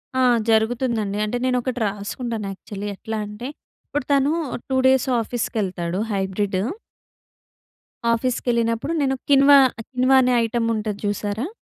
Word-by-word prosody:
ఆ! 260 Hz, -, +2 dB, 0.3 s
జరుగుతుందండి. 220 Hz, -2 st, +1 dB
అంటే 230 Hz, +3 st, -2 dB
నేను 255 Hz, -1 st, +2 dB
ఒకటి 250 Hz, 0 st, -3 dB
రాసుకుంటాను 210 Hz, +2 st, -4 dB
యాక్చువలి. 200 Hz, +1 st, -7 dB
ఎట్లా 220 Hz, +3 st, -5 dB
అంటే 210 Hz, +4 st, -7 dB, 0.4 s
ఇప్పుడు 290 Hz, -3 st, -3 dB
తను 280 Hz, +1 st, +3 dB, 0.4 s
2 265 Hz, -, +1 dB
డేస్ 265 Hz, -1 st, +3 dB
ఆఫీస్‌కెళ్తాడు 195 Hz, -6 st, -2 dB
హైబ్రిడు. 195 Hz, -1 st, -1 dB, 1.5 s
ఆఫీస్‌కెళ్ళినప్పుడు 235 Hz, +2 st, 0 dB
నేను 270 Hz, -1 st, +1 dB
కిన్వా, 280 Hz, 0 st, +7 dB, 0.3 s
కిన్వా 255 Hz, +1 st, +3 dB
అనే 250 Hz, 0 st, +2 dB
ఐటమ్ 230 Hz, 0 st, -1 dB
ఉంటది 210 Hz, -2 st, -3 dB
చూసారా? 205 Hz, +5 st, -2 dB
230 Hz, 120 wpm, -22 LUFS, 205-255 Hz, 1.5 s, కిన్వా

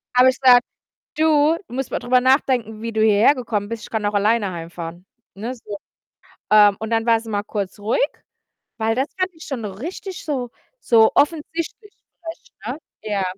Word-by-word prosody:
habe 255 Hz, +1 st, +7 dB
ich 260 Hz, -, -2 dB
gesagt: 250 Hz, -2 st, +7 dB, 0.6 s
„Du, 310 Hz, 0 st, +4 dB
du 245 Hz, -, -10 dB
musst 265 Hz, -1 st, -3 dB
mal -, -, -2 dB
drüber 250 Hz, +1 st, +3 dB
nachdenken, 250 Hz, -4 st, +1 dB
wie 230 Hz, 0 st, -4 dB
du 220 Hz, -, -1 dB
hierhergekommen 220 Hz, -1 st, +2 dB
bist. 230 Hz, -1 st, -5 dB
Ich -, -, -12 dB
kann 220 Hz, -2 st, -2 dB
auch 205 Hz, -, -1 dB
alleine 205 Hz, -1 st, +2 dB
heimfahren.“ 170 Hz, +1 st, -8 dB, 0.3 s
Ne, 230 Hz, +6 st, -5 dB
so. 210 Hz, -4 st, -8 dB, 0.7 s
Ähm, 205 Hz, -2 st, +6 dB
und 220 Hz, -, -4 dB
dann 225 Hz, 0 st, +1 dB
war 230 Hz, -1 st, +4 dB
sie 225 Hz, -, -12 dB
mal 205 Hz, -1 st, -1 dB
kurz 205 Hz, -2 st, -4 dB
ruhig, 215 Hz, +3 st, 0 dB, 0.8 s
weil 225 Hz, 0 st, +1 dB
das 265 Hz, +2 st, +1 dB
fand 370 Hz, 0 st, 0 dB
ich 320 Hz, -, -12 dB
schon 250 Hz, -6 st, -5 dB
richtig 335 Hz, -, -7 dB
so 255 Hz, -6 st, -3 dB, 0.3 s
so 225 Hz, -2 st, +5 dB
offensichtlich 330 Hz, +7 st, -1 dB, 0.3 s
frech, 330 Hz, 0 st, -9 dB, 0.2 s
ne? -, -, -4 dB, 0.2 s
Ja. 205 Hz, -3 st, -1 dB
230 Hz, 180 wpm, -21 LUFS, 210-270 Hz, 0.8 s, habe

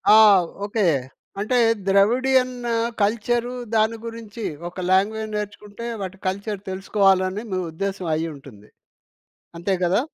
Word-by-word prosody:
ఆ! -, -, +9 dB, 0.5 s
ఓకే. 210 Hz, 0 st, -1 dB, 0.6 s
అంటే 230 Hz, +5 st, +1 dB, 0.3 s
Dravidian 250 Hz, +6 st, +3 dB, 0.5 s
culture 235 Hz, +3 st, +1 dB, 0.2 s
దాని 220 Hz, +1 st, +2 dB
గురించి 230 Hz, -1 st, -7 dB, 0.3 s
ఒక 180 Hz, -, -18 dB
లాంగ్వేజ్ 215 Hz, +3 st, +1 dB
నేర్చుకుంటే 210 Hz, +2 st, -6 dB, 0.2 s
వాటి 190 Hz, 0 st, -5 dB
కల్చర్ 200 Hz, +1 st, -2 dB
తెలుసుకోవాలని 190 Hz, +1 st, +2 dB
మీ 185 Hz, -, 0 dB
ఉద్దేశ్యం 190 Hz, 0 st, -3 dB
అయ్యుంటుంది. 140 Hz, -10 st, -7 dB, 0.9 s
అంతే 190 Hz, +3 st, 0 dB
కదా? 185 Hz, +5 st, +3 dB
205 Hz, 105 wpm, -23 LUFS, 190-225 Hz, 0.9 s, ఆ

